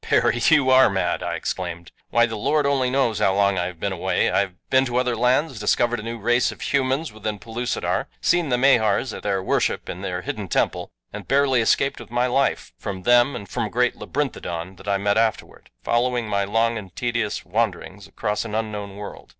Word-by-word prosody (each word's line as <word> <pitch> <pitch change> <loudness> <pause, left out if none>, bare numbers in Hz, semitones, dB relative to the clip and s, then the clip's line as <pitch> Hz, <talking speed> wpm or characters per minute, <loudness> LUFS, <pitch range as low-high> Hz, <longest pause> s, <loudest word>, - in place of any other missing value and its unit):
"Perry, 120 - +2
you 145 -5 +4
ARE 130 -1 +7
mad," 95 -3 -1
I - - -2
exclaimed. 85 -2 -5 0.2
"Why, 120 0 +4
the 115 -1 -5
Lord 145 +8 +1
only 135 -3 +2
knows 125 -5 +1
how 95 - +2
long 100 -1 +2
I 90 - 0
have 90 -3 -9
been - - -2
away. - - 0
I - - +2
have 100 -2 -1 0.2
been 130 0 +5
to 125 -1 -2
other 125 -1 +1
lands, 125 +3 +1
discovered 120 +3 +1
a - - -5
new 115 +2 -5
race 120 +3 +2
of - - -12
humans 135 0 0
within 110 -1 -4
Pellucidar, 115 +5 -2
seen 175 -3 +1
the 125 - +2
Mahars 120 -3 +3
at - - -7
their 95 -2 -1
worship - - 0
in - - -6
their - - -4
hidden - - -4
temple, - - 0 0.2
and - - -8
barely 135 -2 +3
escaped 135 +4 +1
with 120 - -11
my 120 +1 +1
life 135 +2 0
from 95 -3 -5
them 120 +4 +4
and 100 -5 -7
from - - -2
a - - -4
great 125 +3 +1
labyrinthodon 95 - -4
that 100 - -14
I 100 -1 +2
met 100 +2 +1
afterward, 115 -1 -2
following 120 -1 0
my 100 -1 0
long 115 +2 +1
and 95 -4 -12
tedious 115 -3 -2
wanderings 100 -1 -2
across 105 -2 -2
an 110 -2 -5
unknown 105 -3 -4
world. 105 0 -9
115 Hz, 210 wpm, -23 LUFS, 100-125 Hz, 0.2 s, ARE